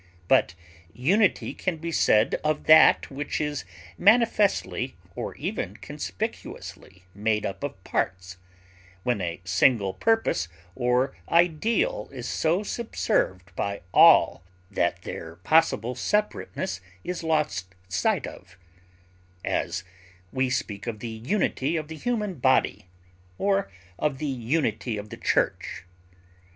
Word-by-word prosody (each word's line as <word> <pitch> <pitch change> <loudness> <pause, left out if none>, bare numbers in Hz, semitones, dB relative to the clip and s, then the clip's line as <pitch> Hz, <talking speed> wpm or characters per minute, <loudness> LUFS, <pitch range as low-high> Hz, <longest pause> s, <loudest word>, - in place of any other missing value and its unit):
But 85 - +3 0.4
unity 185 - +2
can 180 -3 -2
be 165 +1 -4
said 110 -7 +3
of 155 0 0
that 155 -2 +6
which 145 +2 -3
is 150 -2 -2 0.3
manifestly 215 -1 +3 0.2
or - - -5
even - - -4
conspicuously 95 -1 -6
made 105 +1 0
up 95 - -5
of - - -5
parts, 90 0 -2 0.7
when 120 -5 0
a 85 -1 -4
single 95 +2 +3
purpose 225 - +1 0.3
or 125 +2 +1
ideal 220 - +2
is - - -6
so 170 +5 +1
subserved 100 - -1
by 100 +1 -2
all - - +6 0.3
that 100 - 0
their 80 0 -7
possible 125 - +2
separateness 190 - -2 0.2
is 180 - -4
lost 150 - -1
sight 90 - 0
of; 95 0 -11 0.9
as, 90 +1 -1 0.5
we 130 0 0
speak 105 -4 -3
of 115 -2 -3
the 115 +2 -6
unity 135 - -1
of 155 -1 -5
the 160 - -6
human 210 - -2
body, 130 -7 +2 0.5
or 200 0 +1 0.3
of 150 -3 0
the 150 - -4
unity 125 -3 -1
of 105 +1 -7
the - - -7
church. - - 0
130 Hz, 120 wpm, -26 LUFS, 100-170 Hz, 0.9 s, that